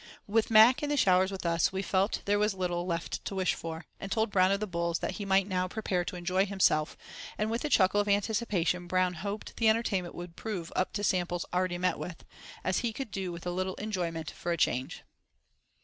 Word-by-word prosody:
With 220 +2 +1
Mac 225 +3 +7
and 295 0 -1
the 290 - +1
showers 185 -5 +4
with 190 -2 -6
us, 170 0 +2
we 190 +1 -2
felt 195 +2 0
there 205 0 +2
was 210 -1 +1
little 175 -1 -2
left 170 -1 -3
to 195 - -5
wish 185 -2 +1
for, 165 0 -6
and 195 - -7
told 220 0 +1
Brown 185 -1 +4
of 200 - +1
the 215 - -1
Bulls 170 -3 -1
that - - -3
he - - -3
might 195 0 +3
now 185 -2 0
prepare 185 -3 -1
to 205 - -5
enjoy 185 +3 +1
himself, 185 -6 +2 0.4
and 215 +1 -1
with 230 +2 -2
a 300 - -1
chuckle 205 -4 +4
of 205 - -4
anticipation 200 -4 0
Brown 185 0 +1
"hoped" 200 +5 -6
the 225 -1 +4
entertainment 205 -6 0
would 175 -1 -8
prove 185 -7 -5
"up 185 - 0
to 205 - -3
samples 175 -3 0
already 180 -1 0
met 180 +1 0
with," 170 -2 -7 0.4
as 185 - +1
he 235 -2 -2
could 265 -2 -6
"do 190 -1 -3
with 170 0 -8
a 175 - -1
little 185 +1 -2
enjoyment 175 -7 -3
for 175 - -4
a 170 - 0
change." 130 -4 -1
185 Hz, 225 wpm, -30 LUFS, 175-205 Hz, 0.4 s, Mac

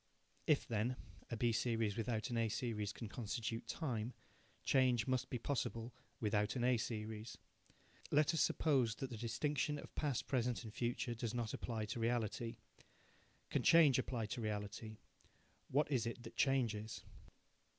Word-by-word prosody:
If, - - +4
then, 115 +3 0 0.3
a 115 - -2
B 120 +1 +3
series 115 -2 +1
without 115 -1 -1
an 120 - 0
A 115 -1 +2
series 110 -2 -1
can 115 - -6
constitute 115 +1 -3
time, 125 -6 -2 0.5
change 125 -4 +4
must 130 -1 0
be 125 - -1
possible 120 -2 -2 0.3
without 105 0 +1
an 125 - 0
A 125 0 +4
series. 110 0 -4 0.7
Let 150 +3 +4
us 165 - +2
suppose 130 -8 +3
that 135 -1 -4
the - - -3
distinction 145 +6 0
of - - -9
past, 145 -5 0
present 125 -2 0
and 110 -2 -8
future 120 +1 -1
does 115 0 -3
not 115 -2 -1
apply 110 -3 -2
to 115 +3 -4
reality. 115 0 0 0.9
Can - - +2
change 155 -6 +7
apply 120 -3 -1
to 120 - -4
reality? 105 +1 -3 0.7
What 145 +2 +2
is 120 -4 +2
it 120 +1 -5
that - - -9
changes? 115 -5 +1
115 Hz, 155 wpm, -39 LUFS, 110-125 Hz, 0.9 s, change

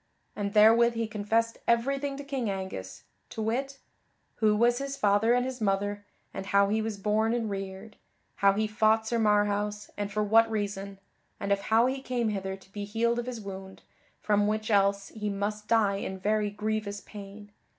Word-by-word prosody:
And 200 -1 -3
therewith 230 +2 +6
he 230 0 0
confessed 220 +2 -1
everything 275 +4 +1
to 285 - -6
King 270 -5 -2
Angus, 190 - -5 0.3
to - - -8
wit: 260 +5 -2 0.6
who 215 -2 +3
was 240 +3 +3
his 275 0 -4
father 210 +2 +3
and 250 0 +1
his 260 -2 -5
mother, 205 0 0 0.3
and 195 0 -6
how 200 0 +4
he 220 +1 +1
was 220 -1 -3
born 215 +3 +1
and 225 -3 -2
reared; 195 +2 -6 0.4
how 200 -1 +4
he 215 +2 0
fought 215 +1 +2
Sir 235 +1 0
Marhaus, 210 -1 +1
and 205 0 -3
for 210 +1 0
what 225 +2 +5
reason; 200 -2 -3 0.4
and 200 - -3
of 200 - +3
how 225 +2 +5
he 265 +1 -1
came 245 -4 -1
hither 190 -2 -3
to 190 0 -19
be 205 0 -5
healed 230 +3 0
of 240 - -4
his 245 -2 -4
wound, 190 -2 -9 0.4
from 205 -1 +2
which 215 +1 -1
else 200 -1 +2
he 210 -2 -4
must 210 +1 -3
die 210 -4 +3
in 190 -1 -4
very 210 +2 0
grievous 210 -1 -3
pain. 205 0 -11
210 Hz, 185 wpm, -28 LUFS, 200-230 Hz, 0.6 s, therewith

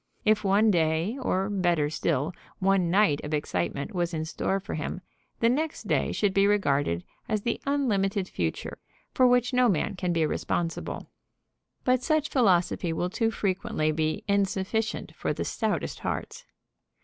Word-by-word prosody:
If 215 0 +3
one 205 +2 +4
day, 165 +4 +1
or 190 -5 0
better 175 -7 +1
still, 155 0 0 0.2
one 190 -2 +2
night 190 -5 +3
of 150 +1 -1
excitement 140 - -2
was 175 -2 -1
in 160 0 -2
store 190 +4 -1
for 195 - -7
him, 155 +4 -4 0.4
the 230 - +5
next 300 +6 -1
day - - +1
should 205 -2 +1
be 195 +1 +4
regarded 140 - +1 0.3
as 215 -2 0
the 235 - -1
unlimited 200 -9 +1
future, 80 - -3 0.3
for 255 - +5
which 245 +1 +3
no 250 -1 +4
man 195 +3 0
can 180 -1 -1
be 165 -2 +2
responsible. 165 +2 -2 0.8
But 255 0 +3
such 310 0 +1
philosophy 185 - +2
will 175 +2 -2
too 225 +1 +1
frequently 185 -7 -1
be 155 +6 -1
insufficient 200 +2 0
for - - -2
the - - -3
stoutest - - -2
hearts. - - -4
190 Hz, 155 wpm, -27 LUFS, 160-215 Hz, 0.8 s, the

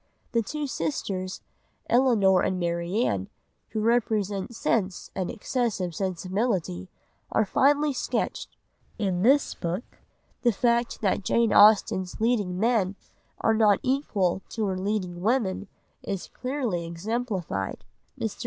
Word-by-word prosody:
The 230 - +2
two 300 +7 -4
sisters, 185 - -3 0.5
Elinor 220 -7 +4
and 185 - 0
Marianne, 170 - -1 0.4
who 215 - -2
represent 215 -2 0
Sense 195 -5 -1
and 185 -2 -2
excessive 225 -6 -2
Sensibility, 185 - -2 0.4
are 220 - +2
finely 285 +7 +3
sketched. - - -3 0.4
In 190 -5 0
this 275 +7 +4
book 175 +6 -3 0.6
the 240 - +4
fact 235 +2 +1
that 200 -1 +1
Jane 230 +3 +2
Austen's 200 -3 +5
leading 210 -6 +1
men 215 -4 +2 0.5
are 225 - +3
not 215 -2 +4
equal 210 -10 0
to 220 -2 -2
her 190 -2 -1
leading 185 -3 -2
women 205 -3 0 0.3
is 195 -3 -4
clearly 250 -10 -2
exemplified. 185 - -3 0.4
Mr. - - -3
205 Hz, 115 wpm, -26 LUFS, 185-235 Hz, 0.6 s, Austen's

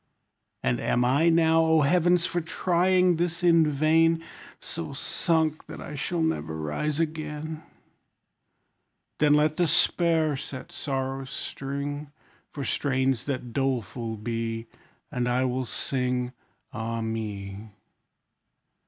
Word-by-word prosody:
And 60 -1 +1
am 125 0 +1
I 145 +7 +4
now, 165 0 +4
O 160 -1 +4
heavens! 175 +3 +3
for 175 -1 -1
trying 180 +1 +2
this 170 +1 -1
in 165 -2 +5
vain, 160 +3 +3 0.4
So - - -5
sunk 160 -2 0
that - - -8
I - - -7
shall 165 +4 -1
never 160 - -1
rise 80 - -2
again? 155 -1 -3 1.6
Then 150 -1 +5
let 150 +1 +2
despair 165 -2 +3
set 130 -1 -8
sorrow's 135 -1 -3
string, 140 +2 -5 0.4
For 140 -2 -5
strains 130 -3 0
that 130 -4 -3
doleful 120 -4 -2
be; 115 +1 -3 0.5
And 125 -1 -1
I 125 +1 +2
will 130 0 -1
sing, 125 0 -1 0.4
Ah 115 0 -3
me! 105 -2 -5
145 Hz, 115 wpm, -27 LUFS, 125-160 Hz, 1.6 s, in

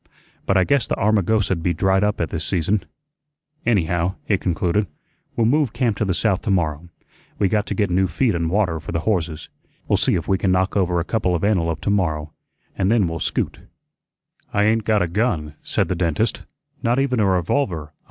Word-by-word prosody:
But 95 - +3
I 95 - +5
guess 140 +2 +1
the - - 0
Armagosa'd 105 -2 +1
be 85 0 0
dried 95 +3 +2
up 105 0 0
at 80 - -2
this 80 -1 -3
season. 90 +2 0 0.8
Anyhow," 90 -4 +1
he 105 - +2
concluded, 90 +2 0 0.5
"we'll 115 - +2
move 140 0 +2
camp 120 -5 0
to 105 - 0
the 95 -3 0
south 100 -2 +1
to - - -4
morrow. 85 -3 0 0.5
We 100 - +2
got 105 +1 0
to - - -3
get 100 -4 0
new 95 +2 +2
feed 120 +3 +1
an' 85 -1 -1
water 90 -4 +1
for 80 - -7
the 85 - 0
horses. 85 -7 -2 0.4
We'll - - +3
see - - +2
if 85 - -3
we 95 -1 +1
can 95 - +1
knock 95 +1 +1
over 90 -3 +1
a - - 0
couple 95 -5 0
of 85 - -3
antelope 85 -6 +1
to 100 - 0
morrow, 80 -6 -1 0.4
and 95 +2 +1
then 110 -6 +3
we'll 80 0 -4
scoot." - - -2 0.9
"I 100 - +2
ain't 110 0 +2
got 105 -3 +3
a - - -1
gun," 85 -6 -1
said - - -1
the - - 0
dentist; 85 -4 -1 0.4
"not 120 +2 +1
even 135 -3 +1
a 105 - +3
revolver. 90 - -1
95 Hz, 205 wpm, -21 LUFS, 85-105 Hz, 0.9 s, I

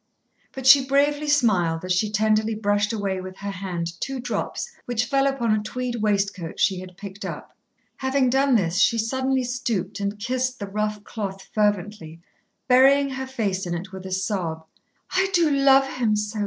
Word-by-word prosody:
But 265 -1 -7
she 270 +1 +8
bravely 290 +2 +2
smiled 185 - +2
as 185 - +1
she 205 +4 +1
tenderly 215 +1 +1
brushed 205 0 +1
away 200 -4 -2
with 185 0 -9
her 200 0 -5
hand 180 -3 -4
two 270 -1 -3
drops 250 - -3
which 245 -1 0
fell 275 +3 +2
upon 255 -5 0
a 215 0 +2
tweed 245 +3 -4
waistcoat 200 -5 -1
she 190 -2 +2
had 185 -1 -11
picked 200 0 -9
up. - - -7 0.4
Having 265 -1 +1
done 270 0 +3
this, 180 -4 +1
she 230 - +4
suddenly 260 +3 0
stooped 225 -6 -3
and 200 +1 -2
kissed 255 +4 -2
the 205 - -5
rough 210 +1 -3
cloth 195 -4 -6
fervently, 205 -5 -1 0.5
burying 275 +2 +5
her 265 0 -4
face 200 -8 -2
in 175 - -2
it 185 +3 -6
with 190 -1 -8
a - - -8
sob. 185 -4 -2 0.5
"I 380 0 +2
do 335 -3 +3
love 275 -1 +5
him 235 -5 0
so!" 210 +1 -3
215 Hz, 180 wpm, -24 LUFS, 195-260 Hz, 0.5 s, she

